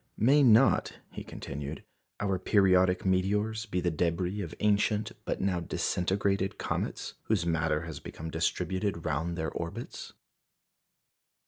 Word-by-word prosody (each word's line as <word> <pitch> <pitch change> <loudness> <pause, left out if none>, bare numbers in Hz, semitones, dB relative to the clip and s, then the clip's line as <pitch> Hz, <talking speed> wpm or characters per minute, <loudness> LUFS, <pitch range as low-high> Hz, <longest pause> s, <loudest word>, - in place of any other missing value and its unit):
"May 135 +7 +5
not," 125 0 +5
he - - -7
continued, 70 +2 -6 0.4
"our 95 -2 0
periodic 95 -2 +3
meteors 105 +4 +1
be 90 -3 -1
the 90 0 +1
débris 90 +5 -1
of 85 -1 -7
ancient 105 +1 +2
but - - -2
now 95 -2 +1
disintegrated 95 +3 0
comets, - - -3
whose - - +1
matter 80 -2 +1
has 80 -3 -7
become 80 +1 -7
distributed 90 +2 -1
round 80 +3 -1
their 80 -1 -2
orbits?" 85 0 -6
90 Hz, 125 wpm, -30 LUFS, 85-100 Hz, 0.4 s, May